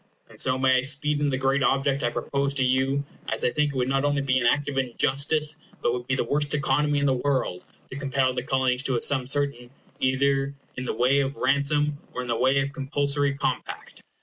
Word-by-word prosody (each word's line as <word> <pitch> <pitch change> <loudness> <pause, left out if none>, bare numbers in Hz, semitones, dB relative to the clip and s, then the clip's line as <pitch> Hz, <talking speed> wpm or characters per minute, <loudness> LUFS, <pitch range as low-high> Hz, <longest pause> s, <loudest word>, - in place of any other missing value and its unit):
And - - -14
so 130 0 +2
may 130 0 +3
I - - +2
speed 145 +2 +1
in 145 - +2
the 130 - -1
great 135 +1 +1
object 135 +1 +1
I 120 - +1
propose 140 +3 -2
to 135 - +1
you, 130 +2 +1 0.2
as 110 - -3
I 125 - +2
think 150 +1 +1
it 135 - -5
would 125 -1 0
not 135 +1 +1
only 145 -1 +1
be 130 -1 +2
an 120 - +2
act 145 +4 +2
of 140 -2 -1
injustice, 140 +4 +1 0.2
but 120 - 0
would 125 0 -5
be 130 - +1
the - - 0
worst 145 +4 0
economy 145 +1 +1
in 140 - +1
the 135 - +3
world, 130 -8 -1 0.3
to 130 - -6
compel 135 -2 0
the 125 - -2
Colonies 130 0 0
to 135 -2 0
a - - +1
sum 130 -3 +2
certain, 140 -3 -1 0.3
either 135 +1 +1 0.2
in 125 - -5
the - - -2
way 125 +4 +3
of 140 +1 -2
ransom 145 +1 +1 0.2
or - - -2
in - - -8
the 120 - 0
way 130 +3 +2
of 140 0 -3
compulsory 140 0 0
compact. 135 -2 -4
135 Hz, 230 wpm, -25 LUFS, 130-140 Hz, 0.3 s, may